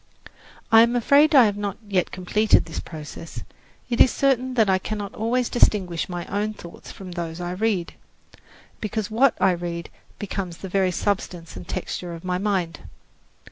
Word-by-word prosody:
I 225 0 +9
am 235 +1 +3
afraid 285 +6 +5
I 255 -4 +9
have 205 -1 0
not 205 -2 -3
yet 190 -3 +1
completed 210 +4 +2
this 165 - -5
process. 160 +1 -8 0.4
It 240 -1 +2
is - - +8
certain 260 -1 +1
that 220 -3 +4
I 190 -1 +3
cannot 205 0 -5
always 235 +3 0
distinguish 185 -8 +2
my 175 -1 -4
own 210 +2 -2
thoughts 170 -3 -11
from 190 -2 -10
those 170 -1 -5
I 175 0 -3
read, 190 -2 -1 0.9
because 215 0 -3
what 245 +3 +3
I 190 0 +4
read 170 -1 -4 0.3
becomes 190 -4 -4
the 190 - -7
very 190 0 +2
substance 180 - -2
and 90 -1 -9
texture 175 -2 -4
of 165 - -11
my 180 0 -1
mind. 190 -5 -1
195 Hz, 170 wpm, -24 LUFS, 175-220 Hz, 0.9 s, I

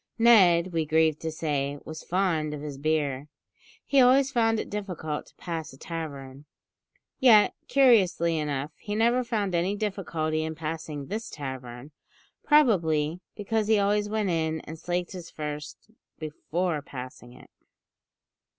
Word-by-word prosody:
Ned, 185 -7 +5
we 165 -1 +1
grieve 155 0 +2
to 160 - -3
say, 145 -3 -2
was 160 0 -7
fond 165 -5 0
of 145 - -8
his 145 -2 -6
beer; 145 -2 -1 0.6
he 275 -1 +4
always 265 +2 +5
found 225 -3 +2
it - - -4
difficult 180 -7 -5
to - - -21
pass 165 -5 -5
a - - -14
tavern. 140 -5 -7 0.7
Yet, 225 -6 +6
curiously 195 -11 +4
enough, 145 -1 -3
he 205 -1 -4
never 235 +3 +3
found 210 -6 -2
any 175 +4 +1
difficulty 165 -7 -2
in 160 0 -4
passing 155 -2 -5
this 215 +8 -5
tavern; 130 -1 -7 0.5
probably 170 - +3 0.2
because 215 +1 -1
he 220 -1 +4
always 205 +1 +1
went 210 -3 0
in 160 -1 -1
and 160 0 -9
slaked 175 +1 -2
his 180 -3 -8
thirst 150 +7 -7 0.3
before 155 +1 -3
passing 125 -3 -9
it. 125 - -17
165 Hz, 140 wpm, -27 LUFS, 150-205 Hz, 0.7 s, Yet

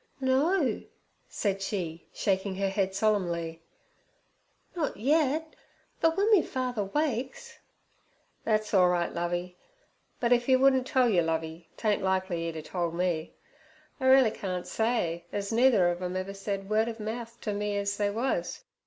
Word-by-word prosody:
'No' 270 - +2 0.5
said 195 -2 -1
she, 175 -5 -4
shaking 190 -1 -1
her 195 0 0
head 190 -1 -1
solemnly, 170 -6 0 1.1
'not 320 -4 -2
yet, 305 +5 +1 0.4
but 325 0 +3
w'en 410 +3 +3
me 410 -5 +7
father 250 -7 -2
wakes—' 265 +2 -3 0.8
'Thet's 215 -1 0
orlright, 180 -2 +3
Lovey, 175 +1 -3 0.6
but 240 0 +3
if 240 +1 +1
'e 260 - +7
wouldn't 260 -1 +4
tell 255 -2 +3
you, 190 -7 +3
Lovey, 160 0 -3
tain't 210 -2 +1
likely 190 -3 0
'e'd 165 - -7
a 155 - -6
told 170 0 -3
me. 170 -3 -1 0.6
I 260 - 0
reelly 260 -4 +6
can't 185 -4 -4
say, 180 -8 -1
ez 200 0 -3
neither 230 -6 +5
ov 175 +1 -5
'em 180 0 -3
ever 190 +1 -4
said 195 0 -4
word 220 +2 +2
ov 225 0 -7
mouth 230 +2 -5
ter 210 - -3
me 205 0 -2
ez 200 0 -1
they 205 -1 +1
was. 265 - -2
205 Hz, 155 wpm, -28 LUFS, 180-250 Hz, 1.1 s, me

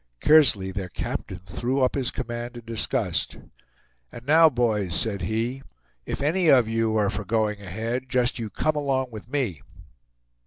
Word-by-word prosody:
Kearsley, 135 -12 +4
their 95 -1 -5
captain, 90 - -5
threw 120 +9 -2
up 125 - +2
his 135 -3 -1
command 120 -1 -5
in 120 - -11
disgust. 115 -4 -1 0.7
"And 120 - -11
now, 160 +3 +6
boys," 110 - 0
said 105 -3 0
he, 115 +4 -2 0.5
"if - - -3
any 170 +4 +2
of 125 -6 +6
you 115 -1 0
are 105 -2 +2
for 100 +1 -4
going 105 0 -1
ahead, 115 +7 -4
just 125 -2 +1
you 110 -2 -4
come 155 +8 -1
along 135 -3 -1
with 110 +1 -10
me." 125 - -2
120 Hz, 160 wpm, -25 LUFS, 105-130 Hz, 0.7 s, now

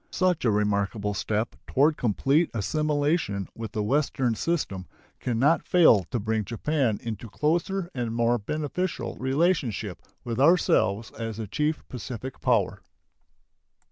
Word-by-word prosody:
Such 185 -3 +1
a - - +4
remarkable 105 0 0
step 105 +2 -2
toward 150 +4 +3
complete 135 - +2
assimilation 145 - 0
with 115 -2 -6
the 105 -3 -1
Western 130 0 +1
system 105 - -2 0.3
can 120 -3 -2
not 145 +7 +4
fail 140 - +5
to 120 - -3
bring 110 +1 -1
Japan 120 +2 0
into 115 -1 -5
closer 175 - -1
and 120 -3 -2
more 120 +1 +2
beneficial 155 - -3
relationship 130 - 0 0.2
with 115 0 -3
ourselves 115 - +3
as 115 -1 -5
the 110 - -4
chief 150 +9 -2
Pacific 125 +1 -7
power. 115 -7 +1
120 Hz, 130 wpm, -26 LUFS, 105-150 Hz, 0.3 s, fail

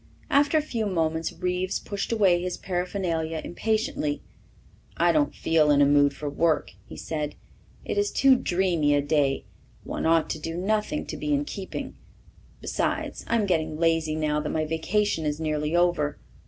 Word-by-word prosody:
After 290 +2 +4
a 305 - +2
few 230 -7 -2
moments 165 -3 0
Reeves 180 +1 -1
pushed 200 +2 -4
away 190 -6 +3
his 180 0 -3
paraphernalia 175 -3 -2
impatiently. 275 +10 -1 0.7
"I - - +4
don't 295 -1 +1
feel 160 -2 +2
in 145 -1 +5
a 145 - +6
mood 145 0 +4
for 145 +1 -6
work," 160 +2 +1 0.2
he - - -10
said. 150 -2 -4 0.5
"It - - -1
is 410 0 +1
too 270 -1 +5
dreamy 175 -9 +1
a 145 - +3
day 145 -2 +1 0.4
one - - -3
ought 165 0 +3
to 155 - -3
do 165 +2 -5
nothing 215 +10 -1
to - - -6
be 300 -1 0
in 285 +1 -1
keeping. 195 -8 -6 0.7
Besides, - - -2
I'm 230 -2 +2
getting 160 -4 0
lazy 165 -1 +1
now 150 -1 0
that 150 - -3
my 155 -1 0
vacation 165 +3 0
is 150 0 -2
nearly 155 0 -1
over. 175 -4 +2
170 Hz, 170 wpm, -26 LUFS, 155-210 Hz, 0.7 s, a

